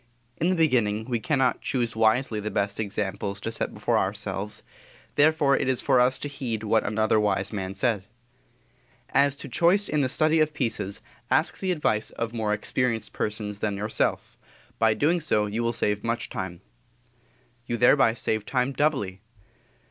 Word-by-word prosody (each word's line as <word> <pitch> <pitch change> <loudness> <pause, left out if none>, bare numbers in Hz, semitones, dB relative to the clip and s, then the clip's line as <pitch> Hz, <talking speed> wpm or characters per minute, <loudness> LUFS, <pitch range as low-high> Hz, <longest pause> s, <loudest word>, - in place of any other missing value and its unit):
In 170 - +1
the 185 - +2
beginning, 115 -10 +2
we 120 -2 -1
cannot 130 0 +1
choose 120 -3 -1
wisely 110 +1 +2
the 105 +1 -3
best 100 0 -2
examples 100 -1 -3
to 115 - -3
set 115 - -3
before - - 0
ourselves; 105 +2 -3 0.5
therefore 145 -2 +4
it - - -1
is 130 -2 +1
for 130 - +3
us 125 +1 +3
to 145 - -5
heed 125 -6 -4
what 110 +1 +2
another 110 +1 +2
wise 105 -1 0
man 95 -2 -4
said: 105 -2 0 1.1
"As 140 0 +3
to 145 - -7
choice 175 +9 +3
in 150 - +1
the 130 - +1
study 155 +3 +2
of 155 -1 +1
pieces, 110 -6 -2 0.3
ask - - +1
the 190 -1 -1
advice 115 -10 0
of 115 0 -4
more 110 -2 -1
experienced 110 +1 -1
persons 105 -1 -3
than 105 -2 -1
yourself; 105 +2 -2 0.4
by 110 -1 +4
so - - -9 0.5
doing 100 - -7
you 115 - 0
will 115 0 +1
save 105 -2 -1
much 115 +1 -2
time." 90 -3 -5 1.1
You 120 - -1
thereby 120 -1 +5
save 110 -2 -1
time 125 +3 0
doubly. 130 -11 0
115 Hz, 170 wpm, -26 LUFS, 105-135 Hz, 1.1 s, thereby